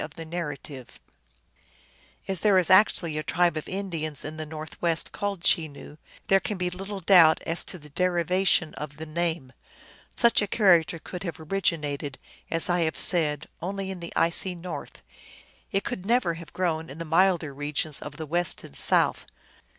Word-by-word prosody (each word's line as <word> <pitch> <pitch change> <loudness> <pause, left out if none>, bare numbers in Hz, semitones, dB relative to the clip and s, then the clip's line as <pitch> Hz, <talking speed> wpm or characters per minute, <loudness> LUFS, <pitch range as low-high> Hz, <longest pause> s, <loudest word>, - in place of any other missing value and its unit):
245 150 -4 -7 1.3
As 190 -2 -2
there 205 -3 +3
is 185 -2 +3
actually 175 -5 +4
a - - -2
tribe 175 +1 +1
of 155 - -5
Indiana 170 -6 -4
in 155 - -7
the 155 0 -6
North 155 0 -9
west 165 -2 0
called 200 -3 -4
Chenoo, 150 -2 +1 0.3
there 195 - +4
can 205 +1 -4
be 180 -1 -2
little 195 +2 -7
doubt 165 -3 +6
as 165 +1 +1
to 185 - -6
the 150 -3 -16
derivation 180 0 +1
of 150 0 -8
the 160 - -7
name. 160 -4 -3 0.6
Such 235 -2 +5
a 205 - -1
character 175 -6 +3
could 175 +2 -9
have 170 -4 -6
originated, 150 -5 -2 0.3
as 165 0 +1
I 175 -1 +1
have 160 -2 -1
said, 150 -5 +3 0.2
only 195 +2 -4
in 190 - -7
the 170 -1 -8
icy 180 +2 +2
north; 175 +1 -8 0.7
it 195 0 0
could 180 - -5
never 225 -4 +1
have 165 -1 -11
grown 165 -3 -2
in 140 - -9
the 165 - -6
milder 165 -2 +2
regions 145 +1 -3
of 145 -1 -8
the 160 - -5
west 175 +3 0
and 70 - -11
south. - - +4
170 Hz, 170 wpm, -26 LUFS, 155-185 Hz, 1.3 s, doubt